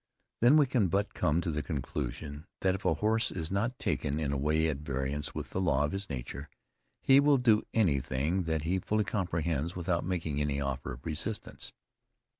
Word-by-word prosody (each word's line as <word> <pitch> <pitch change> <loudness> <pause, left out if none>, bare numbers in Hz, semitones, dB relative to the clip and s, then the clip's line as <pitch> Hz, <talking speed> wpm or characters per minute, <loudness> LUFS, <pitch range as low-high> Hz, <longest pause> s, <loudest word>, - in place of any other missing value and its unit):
Then, 125 +6 +6
we 150 - +6
can 125 -6 +2
but 100 +3 0
come 80 +3 +1
to 85 - -2
the 75 0 -1
conclusion, 75 +1 -4
that 95 -1 +3
if 95 - -6
a 80 - +3
horse 110 +5 +2
is 80 -2 -4
not 115 +6 0
taken 75 +2 -1
in 75 -3 -1
a - - -1
way 75 +3 +2
at 75 -4 -1
variance 70 0 -3
with - - -4
the 95 - -1
law 75 -6 +2
of 75 - 0
his 95 0 -4
nature, 70 +3 -6 0.5
he 135 +1 +7
will 145 0 +5
do 115 -4 +3
anything 75 - +1
that 80 -2 -1
he 90 +4 +1
fully 105 +3 0
comprehends 85 -5 -1
without 85 -1 -1
making 80 -5 -2
any 70 -1 0
offer 70 -2 -3
of - - -12
resistance. 100 +7 -4
80 Hz, 195 wpm, -30 LUFS, 75-100 Hz, 0.5 s, he